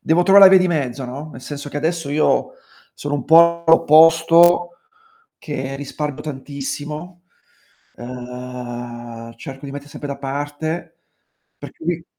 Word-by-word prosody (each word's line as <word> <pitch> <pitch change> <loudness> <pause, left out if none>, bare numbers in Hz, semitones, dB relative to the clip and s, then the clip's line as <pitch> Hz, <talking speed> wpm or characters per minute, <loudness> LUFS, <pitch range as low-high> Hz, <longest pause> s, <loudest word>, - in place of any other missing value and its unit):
devo 165 +2 +2
trovare 195 +2 +7
la - - +7
via 190 - +7
di 185 - +1
mezzo, 135 -6 -2
no. 140 +5 -8
Nel 130 - -11
senso 145 +1 -7
che 145 - -7
adesso 160 +1 -2
io 150 +2 +1 0.4
sono 145 0 -4
un 145 - -3
po' 170 +1 +5
l'opposto, 165 +2 +5 0.7
che 135 -3 -5
risparmio 145 0 -5
tantissimo, 150 +4 -7 0.7
ehm, 120 -1 -8
cerco 135 +1 -9
di 140 - -8
metter 145 +1 -8
sempre 145 -1 -8
da 140 - -5
parte, 145 +4 -5 0.6
per - - -10
cui 175 - -4
145 Hz, 140 wpm, -19 LUFS, 135-165 Hz, 0.7 s, trovare